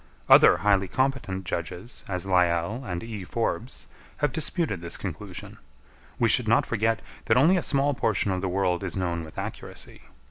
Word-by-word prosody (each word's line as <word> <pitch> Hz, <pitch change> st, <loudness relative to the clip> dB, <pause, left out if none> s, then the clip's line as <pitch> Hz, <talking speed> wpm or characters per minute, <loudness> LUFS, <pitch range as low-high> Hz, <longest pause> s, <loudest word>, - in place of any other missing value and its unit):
Other -, -, +8 dB
highly 100 Hz, -2 st, +3 dB
competent 130 Hz, -7 st, -1 dB
judges, 90 Hz, +7 st, -5 dB
as 90 Hz, -1 st, -3 dB
Lyell 90 Hz, +5 st, +1 dB
and 90 Hz, -7 st, -4 dB
E. 110 Hz, -4 st, -6 dB
Forbes, 115 Hz, +5 st, -2 dB, 0.3 s
have 145 Hz, -2 st, +1 dB
disputed 160 Hz, -, -1 dB
this 85 Hz, 0 st, -4 dB
conclusion. -, -, -7 dB, 0.6 s
We 115 Hz, -, +3 dB
should 115 Hz, +1 st, +4 dB
not 115 Hz, -, +4 dB
forget 115 Hz, 0 st, 0 dB, 0.2 s
that 110 Hz, -, +3 dB
only 160 Hz, +9 st, +5 dB
a 180 Hz, -, +1 dB
small 140 Hz, -1 st, +1 dB
portion 105 Hz, -5 st, +1 dB
of 90 Hz, -1 st, -1 dB
the 95 Hz, -, -1 dB
world 90 Hz, 0 st, 0 dB
is 95 Hz, 0 st, -4 dB
known 85 Hz, -3 st, -1 dB
with 80 Hz, -, -12 dB
accuracy. -, -, -7 dB
100 Hz, 170 wpm, -26 LUFS, 90-120 Hz, 0.6 s, Other